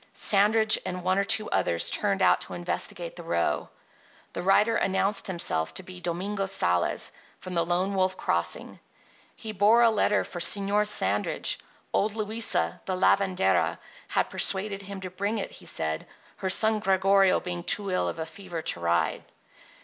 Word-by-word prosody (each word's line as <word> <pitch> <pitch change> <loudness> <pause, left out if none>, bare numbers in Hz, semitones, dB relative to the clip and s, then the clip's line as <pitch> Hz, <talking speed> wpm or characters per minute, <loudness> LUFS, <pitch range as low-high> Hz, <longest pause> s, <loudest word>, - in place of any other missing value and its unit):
Sandridge 215 +2 +4
and 180 0 -5
one 185 +2 +1
or - - +2
two 215 +1 +1
others 85 -1 +1
turned - - 0
out - - +4
to 90 - -8
investigate 85 0 -3
the - - -9
row. 80 -3 -1 0.6
The - - -4
rider 210 +4 +3
announced 195 +1 +1
himself 80 - -1
to - - -4
be 180 -1 -11
Domingo 195 +4 -3
Sales, 90 - 0 0.3
from 185 - -8
the 170 -1 +1
Lone 180 +3 -1
Wolf 185 -1 0
Crossing. 85 0 -2 0.6
he 220 - -7
bore 215 +4 +4
a 230 - +5
letter 210 -1 +2
for 175 - -8
Señor 200 +3 +3
Sandridge. 100 - +1 0.3
Old 210 +1 0
Luisa, 215 - 0
the 185 - -2
lavendera, 135 - +2 0.3
had - - -1
persuaded 195 +1 +1
him 200 0 -8
to 185 -1 -7
bring 200 +4 -2
it, 200 - -4
he - - -11
said, 80 0 -3 0.3
her 190 - -3
son 220 +3 +4
Gregorio 195 -1 +3
being 175 -1 -5
too 200 +1 -1
ill 185 - 0
of - - -6
a 160 - -4
fever 170 -1 -8
to - - -3
ride. 85 0 0
190 Hz, 165 wpm, -26 LUFS, 170-205 Hz, 0.6 s, a